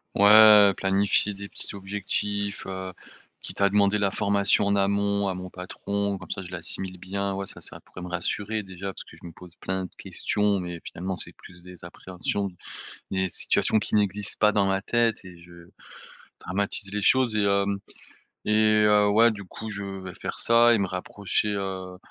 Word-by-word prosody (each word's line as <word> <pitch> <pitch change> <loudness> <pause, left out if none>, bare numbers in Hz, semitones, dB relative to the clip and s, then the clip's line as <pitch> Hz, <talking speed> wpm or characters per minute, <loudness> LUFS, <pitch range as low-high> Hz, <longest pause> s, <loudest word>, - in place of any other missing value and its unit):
Ouais, 105 -1 +8
planifier 100 +1 +2
des 100 0 -8
petits - - -5
objectifs, 100 +1 -2
heu, 95 -1 -6 0.5
quitte - - -6
à 100 - +5
demander 100 +1 +2
la 100 -1 +2
formation 100 +1 +2
en 100 0 +2
amont 100 0 +1
à 95 - -2
mon 90 0 -8
patron. 100 +2 -4
Comme - - -11
ça, - - -4
je 90 - -10
l'assimile 90 +1 -3
bien. 100 +2 -3
Ouais 100 0 -4
ça, - - -5
ça - - -4
pourrait 90 - -12
me 90 - -6
rassurer 105 +5 -1
déjà 95 0 -7
parce - - -10
que - - -16
je - - -13
me 85 - -10
pose 90 0 -15
plein 95 0 -3
de - - -13
questions, 105 -1 0
mais 85 -2 -6
finalement 95 +2 -5
c'est - - 0
plus 85 -1 -16
des 90 -1 -12
appréhensions, 95 +3 -4 0.6
des 95 -1 -1
situations 110 - +1
qui 105 - -3
n'existent 105 -1 0
pas 105 -1 +4
dans 100 -2 +2
ma 95 0 0
tête 115 -1 0
et 90 -2 -12
je 85 0 -16 0.7
dramatise 100 +1 -2
les 105 - -2
choses 125 +1 +3
et 105 - +2
hem 100 0 +1 0.7
et 105 - -1 0.3
heu, 105 -1 +4
ouais 115 +2 +5
du 100 -1 -8
coup 110 +4 -8
je 100 0 -5
vais 95 -2 -7
faire - - -6
ça 120 +1 +5
et - - +2
me 100 - 0
rapprocher, 95 +3 -2
heu 95 -2 -5
100 Hz, 190 wpm, -25 LUFS, 95-105 Hz, 0.7 s, Ouais